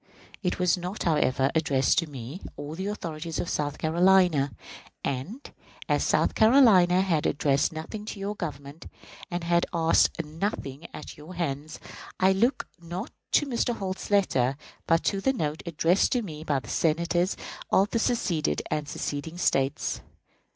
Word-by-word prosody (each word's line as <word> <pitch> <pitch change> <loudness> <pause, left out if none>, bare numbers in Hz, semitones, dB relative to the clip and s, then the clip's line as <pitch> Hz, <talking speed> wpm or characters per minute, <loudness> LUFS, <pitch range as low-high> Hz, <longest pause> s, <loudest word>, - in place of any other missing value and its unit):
It 180 -3 -1
was 180 0 +2
not, 180 +4 -4
however, 135 -4 +2
addressed 145 -3 +2
to 165 -3 -3
me, 135 +5 -8 0.2
or 145 +2 -6
to 185 - -6
the 195 - -2
authorities 165 -5 -4
of - - -2
South 145 -1 -2
Carolina; 170 -3 +3 0.5
and, 160 - -4 0.4
as - - +2
South - - +2
Carolina 220 -7 +6
had 170 -6 +1
addressed 140 -1 +1
nothing 165 +7 -6
to 210 - -6
your 200 +1 -3
Government, 145 -3 -7 0.4
and 175 -1 -3
had 170 0 +2
asked 165 -1 +3
nothing 155 -2 -4
at 150 - -9
your 155 +5 -11
hands, 155 -2 -3 0.4
I 190 +1 +5
looked 235 +7 +1 0.2
not 175 +6 -6 0.2
to 295 - +4
Mr. 240 -2 0
Holt's 190 -2 -5
letter 140 -10 +2 0.3
but 165 0 +3
to 195 -1 0
the 265 +6 +2
note 155 - -2
addressed 170 +3 +2
to 245 -2 +1
me 155 -5 -7
by 145 -3 0
the - - -12
Senators 170 +3 +1 0.3
of 195 +2 +3
the 230 - +1
seceded 170 - 0
and 150 -1 -1
seceding 145 +5 -4
States. 135 -5 0
170 Hz, 160 wpm, -27 LUFS, 150-190 Hz, 0.5 s, Carolina